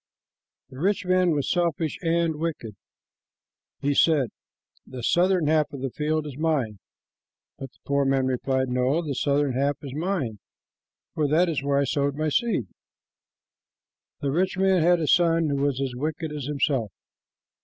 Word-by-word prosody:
The 130 - -10
rich 195 +4 0
man 185 0 +3
was 145 -4 0
selfish 170 -3 0
and 165 -2 +1
wicked. 150 -10 -4 1.1
He 145 +1 +1
said, 140 -5 +3 0.5
"The 125 -2 -9
southern 180 +4 +2
half 155 0 +2
of 140 - -7
the 135 -1 -3
field 155 +2 -1
is 145 -1 -8
mine," 135 -11 0 0.8
but 135 - -6
the - - -30
poor 140 0 +1
man 135 -1 +1
replied, 130 +1 0
"No, 125 +6 +1
the 150 -3 -3
southern 140 0 +1
half 140 +3 0
is 135 -2 -7
mine, 150 - -2 0.7
for 150 -2 0
that 165 +5 +3
is 155 -4 -1
where 140 0 0
I 140 - +3
sowed 140 +1 0
my 155 +1 -1
seed." 205 - 0 1.6
The 140 - -1
rich 185 +5 0
man 190 -2 +3
had 175 +2 +4
a 160 - -1
son 165 0 +3
who 140 - 0
was 140 -1 0
as 135 -2 -2
wicked 155 +5 -3
as 150 -3 -5
himself. 135 -6 0
145 Hz, 165 wpm, -25 LUFS, 135-165 Hz, 1.6 s, had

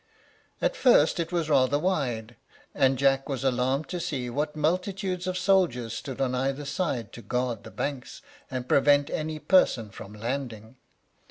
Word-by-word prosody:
At - - +2
first 210 - +4
it 165 0 -2
was 170 -3 0
rather 145 -2 +3
wide, 125 -10 -1 0.4
and 135 -2 +3
Jack 135 +1 +2
was 135 -3 -3
alarmed 130 +3 +1
to 180 - -3
see 140 -8 -3
what 150 +4 -2
multitudes 180 +3 -1
of 185 0 -1
soldiers 175 - +2
stood 130 +3 -6
on 130 -2 0
either 135 +3 -1
side 140 - -2
to 120 - -9
guard 120 0 -2
the - - -9
banks, 140 -3 -5 0.3
and 130 -1 -4
prevent 145 +1 +4
any 155 0 -3
person 130 - +3
from 100 +1 -10
landing. 115 0 -5
140 Hz, 160 wpm, -27 LUFS, 125-165 Hz, 0.4 s, first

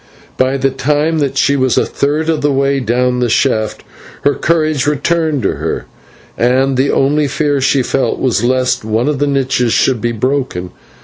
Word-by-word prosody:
By 130 +1 +1
the 135 0 0
time 150 +4 0
that 140 -3 -1
she 140 - +2
was 130 -2 +1
a - - +3
third 150 +3 -1
of 160 -2 0
the 145 0 +1
way 140 0 +1
down 125 +1 0
the 120 -1 0
shaft 110 0 0 0.4
her 145 - +3
courage 155 -3 0
returned 150 -1 0
to - - -1
her, - - -3 0.5
and 130 +3 +1
the 135 +2 +1
only 145 +2 +1
fear 145 0 0
she 135 0 +2
felt 135 +2 -1
was 120 -4 0
lest 130 +1 +1
some 110 +4 -1
of 150 -3 -1
the 145 - +1
niches 130 -4 0
should 125 -4 +1
be 120 - 0
broken. 115 -7 -2
135 Hz, 185 wpm, -14 LUFS, 125-145 Hz, 0.5 s, a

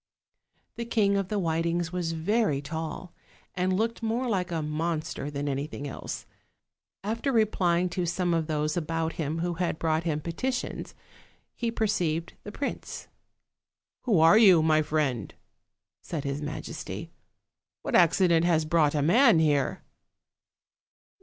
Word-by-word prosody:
The 235 - -3
King 210 -4 +2
of 195 -2 0
the 210 - -2
Whitings 170 -1 0
was 175 -2 -1
very 185 -1 +1
tall, 160 +4 -6 0.4
and 180 +1 0
looked 225 +3 -1
more 230 +3 -1
like 185 -5 -1
a 165 -2 -1
monster 155 -1 -2
than 145 0 -4
anything 140 +1 -3
else. 135 - -6 0.8
After 230 +7 -1
replying 185 -6 +2
to 175 -1 -2
some 175 0 0
of 165 -2 0
those 155 -1 -1
about 165 -1 -1
him 155 0 -3
who 175 0 -1
had 170 -1 -2
brought 160 0 0
him 155 -3 -1
peti 170 - -3
tions, 255 - -4 0.6
he 235 - -2
perceived 180 -8 -1
the 205 - -7
prince. 280 +6 -5 1.0
"Who 215 -9 +3
are 165 +7 +7
you, 185 -8 +7
my 155 -1 +4
friend?" 145 - -1 0.7
said 155 -4 -5
his 140 +1 -3
majesty. 150 +1 -6 0.7
"What - - -4
accident 170 -1 +4
has 165 -3 +2
brought 155 -2 +2
a 145 - +1
man 225 - +5
here?" 150 -3 +1
170 Hz, 140 wpm, -27 LUFS, 155-195 Hz, 1.0 s, are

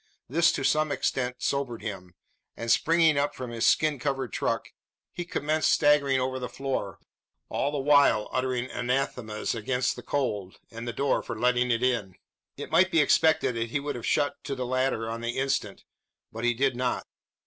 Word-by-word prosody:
This 165 +6 +3
to 135 - -3
some 155 +2 +2
extent 125 -3 -1
sobered 135 -4 -2
him; 90 -4 -7 0.4
and, 115 0 -1
springing 160 -3 +4
up 145 +1 0
from 125 -2 -6
his 115 -1 +1
skin 155 -3 +3
covered 135 -3 -2
truck, - - -1 0.4
he 175 - -4
commenced 155 -2 0
staggering 145 -3 +4
over 130 0 -2
the 125 - -5
floor 135 -8 -3 0.5
all 140 - -1
the 145 - -2
while 140 -6 +4
uttering 130 -1 -1
anathemas 125 -3 -2
against 125 +3 -1
the - - -8
cold, 105 -9 -2
and 115 +1 -7
the - - -1
door 140 +3 0
for 115 - -6
letting 125 +1 +2
it 115 0 +1
in. 115 -8 0 0.4
It 145 - -7
might 180 +4 +5
be 165 - +2
expected 150 -2 +3
that 115 0 -3
he 140 - -1
would 145 +1 -3
have 120 - -6
shut 145 - 0
to 135 - -3
the 130 -1 -3
latter 130 -2 0
on 115 +1 -4
the 115 0 -3
instant; 135 -6 -1 0.5
but 115 +2 -4
he 120 0 +2
did 135 +1 +1
not. 125 0 -1
130 Hz, 185 wpm, -27 LUFS, 115-145 Hz, 0.5 s, might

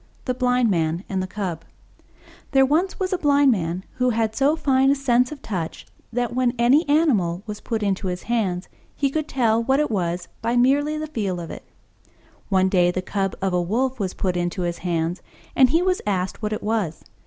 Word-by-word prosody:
THE 255 - 0
BLIND 250 -2 +2
MAN 165 0 0
AND 190 -1 -1
THE 185 - -3
CUB 180 -5 -4 0.9
There 270 0 +6
was 330 +8 0
once 375 -1 -1
a 365 - 0
Blind 285 -2 +4
Man 180 -3 -2
who 250 0 +2
had 220 -2 0
so 280 +3 +3
fine 270 -4 +3
a 280 - +4
sense 250 -2 +2
of 300 - -9
touch 175 -6 -4 0.3
that, 245 0 -1
when 250 0 +1
any 265 +7 +3
animal 210 - +2
was 210 -2 -7
put 225 -2 -2
into 195 -1 -1
his 180 0 -4
hands, 195 -6 -1 0.3
he 275 -2 0
could 310 +1 -2
tell 230 -5 +2
what 265 +4 +2
it 300 -5 0
was 175 -3 -2 0.2
merely 260 +6 +2
by - - -3
the 310 - -3
feel 195 -8 -2
of 170 - -7
it. - - -10 0.8
One 190 -1 +3
day 180 -2 +3
the 185 +1 -2
Cub 195 0 -2
of 190 -1 0
a 180 - +2
Wolf 250 +8 -1
was 190 -3 -2
put 185 -2 -1
into 175 +1 -2
his 175 0 -2
hands, 170 0 -2 0.3
and 260 -2 +6
he 330 +6 +3
was 370 0 +1
asked 190 -1 -1
what 210 -1 -2
it 215 - -4
was. 210 -7 -1
225 Hz, 210 wpm, -23 LUFS, 185-265 Hz, 0.9 s, There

